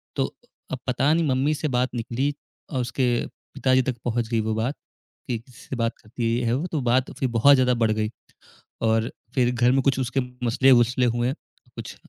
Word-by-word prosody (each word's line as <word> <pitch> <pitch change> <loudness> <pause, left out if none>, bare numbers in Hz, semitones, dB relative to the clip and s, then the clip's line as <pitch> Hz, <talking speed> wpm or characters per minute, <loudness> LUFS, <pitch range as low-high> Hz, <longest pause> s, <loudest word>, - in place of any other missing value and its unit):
तो - - +1
अ, - - -12 0.2
अब 130 - -3
पता 135 +4 +2
नहीं 165 0 +2
मम्मी 135 +3 +2
से 155 - -2
बात 130 +1 0
निकली 125 +5 -1 0.4
और 130 -3 0
उसके 125 +2 -1 0.5
पिताजी 130 -1 +3
तक 125 -1 -3
पहुँच 120 -1 0
गई 115 -1 +1
वो 110 - 0
बात, 120 +6 -1 0.5
कि, 120 -2 -1
"किससे 125 +3 -10
बात 115 -1 -1
करती 120 +2 -7
है 120 - +1
ये? 125 - -2
है 115 - +1
वो।" 150 +8 -1
तो 155 -4 -1
बात 130 +2 +2
फिर 130 - +1
बहुत 140 +5 +7
ज़्यादा 125 -1 +3
बढ़ 110 - +3
गई 110 0 0 0.7
और 110 0 +1 0.2
फिर 125 -2 +2
घर 120 +1 +4
में 135 0 +3
कुछ 135 0 +1
उसके 130 +1 -1 0.3
मसले-वसले 125 0 +4
हुए, 120 +2 +1 0.4
कुछ - - -7
125 Hz, 205 wpm, -24 LUFS, 115-130 Hz, 0.7 s, बहुत